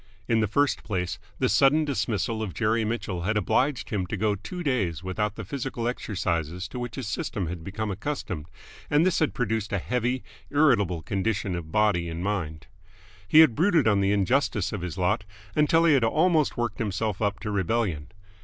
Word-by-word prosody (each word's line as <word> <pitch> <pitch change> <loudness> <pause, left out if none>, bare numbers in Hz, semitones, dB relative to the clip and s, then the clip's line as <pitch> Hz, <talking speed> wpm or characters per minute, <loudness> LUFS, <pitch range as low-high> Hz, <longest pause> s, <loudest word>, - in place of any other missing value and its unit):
In 115 -1 +3
the 105 - +2
first 145 +7 +1
place, 90 -4 -2 0.2
the - - +2
sudden 140 - +4
dismissal 110 -3 -1
of 105 -5 -4
Jerry 115 0 +1
Mitchell 105 -5 -3
had 105 +5 0
obliged 130 +4 0
him 95 -4 -1
to 105 - -3
go 105 +1 +1
two 110 - -6
days 95 - 0
without 100 +3 -2
the 110 - -6
physical 125 0 -3
exercises 90 -7 -2
to 125 - -6
which 120 -3 -5
his 130 -5 -5
system 100 -2 -2
had 85 0 -5
become 105 +3 -3
accustomed, 95 - -4 0.4
and 150 +3 +4
this 185 - +2
had 155 - +1
produced 110 -4 -1
a 100 - +1
heavy, 125 +5 -1 0.3
irritable 110 - +3
condition 100 0 -1
of 85 -3 -5
body 100 -5 +2
and 85 +2 -5
mind. 85 -7 -3 0.6
He 155 - +8
had 155 -7 +6
brooded 165 - +3
on 100 -2 +3
the 100 0 +2
injustice 105 0 +1
of 100 - -3
his 90 0 -5
lot 95 +2 +1 0.3
until 165 +2 +4
he 160 - +6
had 135 -4 +3
almost 155 +5 +2
worked 120 -3 -2
himself 105 -1 -2
up 100 -1 0
to 105 - -3
rebellion. 95 -6 0
105 Hz, 190 wpm, -26 LUFS, 95-125 Hz, 0.6 s, He